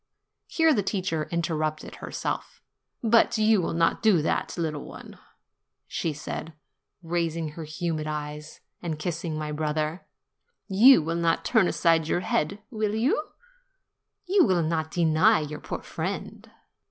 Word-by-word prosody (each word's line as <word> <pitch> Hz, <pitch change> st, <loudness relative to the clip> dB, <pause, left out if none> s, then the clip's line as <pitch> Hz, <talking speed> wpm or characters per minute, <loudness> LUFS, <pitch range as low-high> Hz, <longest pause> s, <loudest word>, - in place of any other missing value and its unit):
Here 320 Hz, -1 st, +3 dB
the 215 Hz, -, +2 dB
teacher 185 Hz, -5 st, -2 dB
interrupted 155 Hz, -2 st, -2 dB
her -, -, -8 dB
self. -, -, -4 dB, 0.4 s
"But 230 Hz, 0 st, +4 dB
you 215 Hz, -2 st, +4 dB
will 165 Hz, -, -2 dB
not 165 Hz, 0 st, +2 dB
do 215 Hz, -6 st, +5 dB
so, -, -, +1 dB, 0.2 s
little 155 Hz, -3 st, -2 dB
one?" -, -, -11 dB, 0.7 s
she 165 Hz, -, -2 dB
said, 150 Hz, +2 st, -6 dB, 0.5 s
raising 165 Hz, -1 st, -1 dB
her 155 Hz, +1 st, -8 dB
humid 155 Hz, -1 st, -3 dB
eyes, 150 Hz, 0 st, -6 dB, 0.2 s
and 165 Hz, -3 st, -3 dB
kissing 165 Hz, 0 st, -3 dB
my 155 Hz, 0 st, -4 dB
brother. 155 Hz, +2 st, -2 dB, 0.6 s
"You 215 Hz, -, +7 dB
will 165 Hz, +2 st, -2 dB
not 170 Hz, -1 st, +1 dB
turn 185 Hz, -, +4 dB
aside 165 Hz, -2 st, +2 dB
your 175 Hz, -, 0 dB
head, 180 Hz, +1 st, 0 dB
will 215 Hz, -2 st, -1 dB
you? 255 Hz, +7 st, +1 dB, 1.0 s
You 380 Hz, 0 st, +4 dB
will 180 Hz, -, +2 dB
not 160 Hz, 0 st, -1 dB
deny 170 Hz, +5 st, +3 dB
your 150 Hz, 0 st, -5 dB
poor -, -, -6 dB
friend?'' -, -, -5 dB
165 Hz, 140 wpm, -26 LUFS, 155-195 Hz, 1.0 s, You